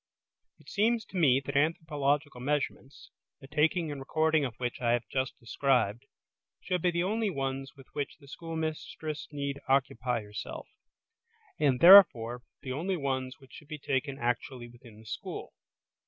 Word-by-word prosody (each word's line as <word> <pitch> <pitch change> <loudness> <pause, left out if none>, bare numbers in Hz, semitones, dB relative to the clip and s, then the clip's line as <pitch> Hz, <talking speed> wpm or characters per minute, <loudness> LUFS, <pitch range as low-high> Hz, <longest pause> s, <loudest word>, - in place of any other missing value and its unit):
It - - -23
seems 220 +1 +1
to - - -15
me 135 -7 +5
that 140 0 -6
anthropological 145 -3 0
measurements, 140 0 -3 0.3
the 135 - -13
taking 155 +3 +1
and 145 - -5
recording 155 +2 +2
of 125 -5 -3
which 120 -1 -3
I 120 -1 +2
have 120 -1 -1
just 130 -1 -2
described, 120 -1 0 0.5
should 180 -2 -2
be 180 - +3
the 170 0 0
only 215 +3 0
ones 135 -4 -4
with 135 -1 -15
which 145 -1 -4
the 140 -3 -18
schoolmistress 155 -1 -5
need 140 -1 -3
occupy 125 -3 +1
herself; 105 0 -7 0.9
and, 130 -4 +2
therefore, 125 - +8 0.2
the 130 - -5
only 180 +7 -1
ones 130 -3 -2
which 135 - -19
should 150 - -12
be 155 0 -6
taken 135 0 -2
actually 120 0 -2
within 120 -2 -16
the - - -18
school. 110 - -6
140 Hz, 155 wpm, -30 LUFS, 130-155 Hz, 0.9 s, therefore